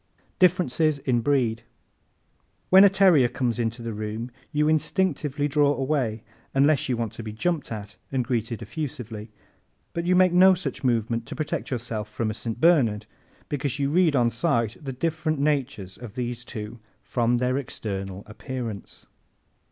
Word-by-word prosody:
Differences 165 -5 +3
in 125 -3 0
Breed 120 -4 +1
¶ - - -37 1.0
When 190 +1 +9
a 200 - +8
terrier 185 -9 +5
comes 120 -1 -2
into 115 +1 -2
the 115 -1 -4
room 110 +3 -5 0.2
you 150 0 +2
instinctively 155 -3 0
draw 145 0 +3
away 130 -6 -1 0.3
unless 140 +1 +3
you 125 - +1
want 115 -3 -3
to - - -7
be 110 -1 -6
jumped 155 +7 -2
at 105 -2 -7
and 130 -3 0
greeted 115 -2 -2
effusively. 120 -8 -6 0.6
But 170 0 -3
you 180 - +4
make 185 -1 +5
no 185 +1 +7
such 180 -4 -5
movement 115 -2 0
to - - -6
protect 155 +1 -3
yourself 115 -4 -4
from 110 +1 -2
a - - -4
St. 115 +1 -5
Bernard 135 -11 +3 0.4
because 140 -2 -2
you 140 0 0
read, 170 -2 +3
on 120 -2 +3
sight, 115 -4 0
the 135 - -4
different 155 +3 -1
natures 135 -10 -1
of 120 -4 -9
these 120 -1 -3
two 110 -1 -7 0.2
from 120 0 +1
their 125 +2 +1
external 100 -6 -5
appearance. 115 -1 -7
125 Hz, 160 wpm, -25 LUFS, 115-150 Hz, 1.0 s, When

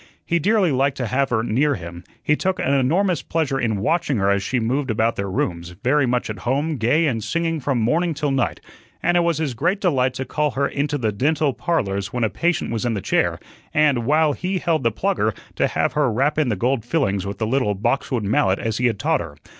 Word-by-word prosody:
He 170 - +1
dearly 195 0 +2
liked 135 +1 +1
to 125 - -2
have 130 +4 0
her 110 -2 +1
near 140 +6 +1
him, 85 -1 -8 0.2
he 150 - +3
took 190 +3 -1
an 135 - 0
enormous 165 +6 +2
pleasure 150 -5 -1
in 110 -4 0
watching 145 - +1
her 100 0 +2
as 100 0 +1
she 125 +6 -1
moved 130 +4 -1
about 110 +1 +1
their 100 0 -3
rooms, 85 -2 -3
very 135 +1 +3
much 125 0 0
at 105 -3 -6
home, 140 +7 -1
gay 125 +9 +2
and 115 -7 -1
singing 165 +7 -1
from 135 -2 -1
morning 160 +9 +1
till 145 -1 -1
night; 135 -2 -1 0.4
and 175 +1 +2
it - - +5
was 170 -2 +1
his 155 -5 -1
great 175 - 0
delight 130 -9 +1
to 130 - -3
call 150 +3 0
her 140 0 +2
into 145 +1 -1
the 110 -5 0
"Dental 140 +6 +1
Parlors" 100 - -1
when 125 -2 -1
a 110 - +1
patient 170 - 0
was 115 -2 -2
in 120 -2 0
the - - -2
chair - - +1 0.4
and, 150 -4 +4
while 155 0 +3
he 185 +5 -2
held 165 -3 0
the 115 -2 +1
plugger, 110 - 0 0.2
to - - +2
have - - 0
her 145 -5 +2
rap 140 +7 +1
in 150 -5 +2
the 110 - +1
gold 120 +4 0
fillings 105 - 0
with 100 0 -5
the 110 - -1
little 115 -3 +1
box 120 +7 -1
wood 120 -4 -1
mallet 100 -1 +2
as 110 0 -2
he 125 - +3
had 115 -4 -1
taught 100 - +1
her. 80 -4 -8
130 Hz, 240 wpm, -21 LUFS, 110-155 Hz, 0.4 s, it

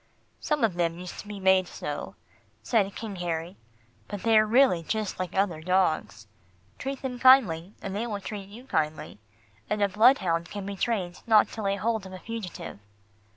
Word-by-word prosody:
"Some 300 -4 -1
of 220 -5 +3
them 170 -1 -1
used 180 0 -8
to - - -9
be 205 -1 -7
made 190 -1 +4
so," - - -6 0.5
said 200 -5 +1
King 210 -4 -6
Harry, 170 +1 -3 0.5
"but 205 -2 -6
they 225 -1 +4
are 215 0 +6
really 235 -6 +4
just 215 +5 -3
like 185 -2 -4
other 190 -5 +1
dogs. 180 -9 0 0.5
Treat 270 +1 -5
them 250 -2 -4
kindly, 210 -9 +5
and 195 0 -4
they 225 +4 -2
will 210 -3 -3
treat 200 -1 -7
you 235 +5 -12
kindly, 155 - -2 0.5
and 210 - 0
a - - +4
bloodhound 190 -6 +3
can 205 -2 -6
be 200 0 -5
trained 190 -4 -2
not 220 -2 +5
to 220 - -7
lay 200 -1 0
hold 215 0 -1
of 185 - -11
a - - -6
fugitive." 220 - -7
200 Hz, 185 wpm, -27 LUFS, 180-225 Hz, 0.5 s, are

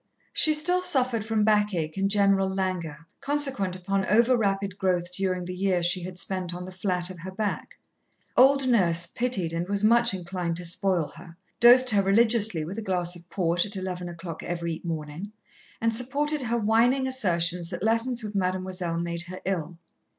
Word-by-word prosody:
She 310 -1 +4
still 355 +4 +3
suffered 255 - +1
from 220 -1 0
backache 205 -7 +1
and 195 0 0
general 195 -1 +2
languor, 180 -5 -3
consequent 275 -10 -1
upon 195 +1 -2
over 235 +5 +4
rapid 200 -3 -1
growth 180 -2 -1
during 185 -1 -2
the 180 - -5
year 185 -1 0
she 180 +1 +1
had 180 +1 -8
spent 180 -1 -1
on 180 0 -7
the 185 - -9
flat 180 -1 -2
of 180 - -11
her 185 +3 -7
back. 205 +2 -4 0.6
Old 270 +1 +5
Nurse 170 -8 +3
pitied 190 -4 -2
and 170 +2 -3
was 200 0 0
much 235 +2 +4
inclined 175 -2 -4
to 180 - -5
spoil 180 -2 +1
her, 165 -2 -13 0.2
dosed 250 +1 +7
her 205 -2 +3
religiously 210 -4 +2
with 190 +7 -6
a - - -4
glass 180 -3 -1
of 175 0 -15
port 175 -1 0
at 205 0 -5
eleven 180 -2 -5
o'clock 170 -1 -8
every 170 -2 -4
morning, 165 +4 -6 0.5
and 230 0 +1
supported 285 +5 0
her 235 -1 -1
whining 235 +5 +2
assertions 175 -8 +1
that 175 0 -6
lessons 230 +2 +1
with 210 -1 -6
Mademoiselle 185 -2 -2
made 170 0 -3
her 185 +1 -8
ill. 175 -3 -3
190 Hz, 180 wpm, -26 LUFS, 175-225 Hz, 0.6 s, dosed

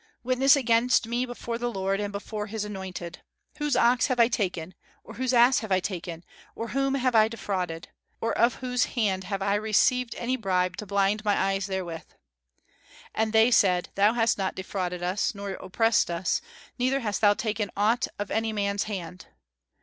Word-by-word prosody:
Witness 255 +3 +4
against 245 -2 +2
me 240 +2 -1
before 235 -1 -5
the 240 0 -2
Lord, 195 -1 -1
and 205 -1 -3
before 210 +1 -5
his 210 0 -4
anointed. 190 -4 -7 0.4
Whose 295 -3 0
ox 245 0 +3
have 255 -2 -1
I 230 0 +6
taken, 185 -6 -2 0.3
or 225 - -11
whose 255 +2 -1
ass 245 +1 +5
have 220 -4 -7
I 185 - +4
taken, 175 -3 -5 0.3
or 230 0 -5
whom 275 +1 0
have 255 -2 +1
I 220 -1 +6
defrauded? 185 -7 -4 0.3
Or 230 - -1
of 235 +2 +3
whose 250 -1 0
hand 190 -5 0
have 195 0 -3
I 200 - +1
received 220 +4 +2
any 255 +2 -2
bribe 185 -4 0
to 210 - -6
blind 200 +2 +1
my 205 -2 +2
eyes 195 0 0
therewith? 180 -4 -4 1.1
And 220 0 0
they 225 +2 +5
said, 180 -5 +3
Thou 205 +3 +3
hast 225 -3 +2
not 190 -1 -1
defrauded 180 -2 -4
us, 185 +4 -1
nor 200 0 -5
oppressed 215 +4 +1
us; 170 +1 -1 0.4
neither 260 +2 +1
hast 210 -3 -2
thou 205 -1 +5
taken 210 -2 -2
aught 225 +5 +2
of 205 0 -5
any 225 0 0
man's 200 -1 -1
hand." 185 -3 -6
210 Hz, 180 wpm, -26 LUFS, 190-235 Hz, 1.1 s, I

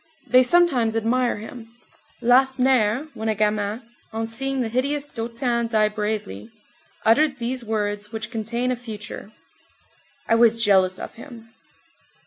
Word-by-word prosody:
They 255 0 +5
sometimes 255 -6 +3
admire 235 +2 +1
him. 225 +2 -9 0.6
Lacenaire, 255 0 +3
when 220 0 -3
a 215 - +1
gamin, 210 +1 -1 0.3
on 225 0 -3
seeing 270 +4 -3
the 235 - -1
hideous 280 +5 -1
Dautin 235 -1 -2
die 215 -2 +2
bravely, 210 - -4 0.6
uttered 270 +5 +4
these 250 +1 -3
words 210 -1 -2
which 220 0 -6
contain 235 +2 -2
a - - 0
future: 215 -3 -9 1.0
"I - - +2
was 230 0 +4
jealous 190 -3 +3
of - - -7
him." 230 -5 -13
230 Hz, 130 wpm, -23 LUFS, 215-255 Hz, 1.0 s, They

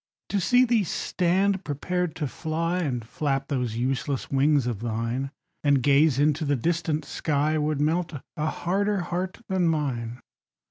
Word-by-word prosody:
To 200 - +1
see 250 +7 +4
thee 230 -3 +3
stand 190 +3 +1
prepared 175 +4 -2
to 155 -3 -2
fly, 165 +5 -2
And 125 -9 -2
flap 135 +2 -2
those 125 -6 -1
useless 130 +2 -1
wings 140 0 +3
of 120 -5 -2
thine, 115 +4 -2 0.3
And 140 -3 +3
gaze 145 0 +4
into 150 +2 +2
the 145 -1 +1
distant 160 +2 -1
sky, 155 +1 0
Would 150 -1 0
melt 160 +4 +1 0.2
a 155 0 -1
harder 195 +5 0
heart 180 +4 -3
than 185 -3 +1
mine. 130 -7 -1
150 Hz, 150 wpm, -26 LUFS, 135-175 Hz, 0.3 s, see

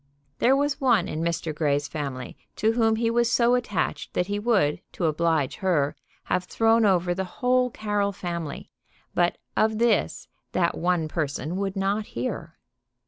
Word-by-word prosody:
There 260 +3 +5
was 285 +1 0
one 240 -9 +3
in 155 - -3
Mr. 165 -1 -1
Grey's 145 -2 0
family 140 -5 -5 0.2
to 220 +2 +2
whom 225 -1 +2
he 230 +1 +1
was 235 0 +2
so 240 0 +4
attached 205 -11 -1
that 180 - +2
he 205 +2 -2
would, 200 -9 +2
to 175 - -2
oblige 160 -3 +1
her, 155 -6 +1 0.3
have 180 0 -1
thrown 225 +3 +3
over 180 -2 +2
the 190 +2 -2
whole 250 +6 +1
Carroll 205 -3 -1
family; 170 -5 -5 0.4
but 175 0 +2 0.2
of 220 0 +2
this 235 +1 +1 0.3
that 170 -2 +1
one 175 -2 0
person 155 +1 -3
would 195 0 -2
not 200 +2 0
hear. 170 -10 -4
190 Hz, 160 wpm, -25 LUFS, 165-225 Hz, 0.4 s, There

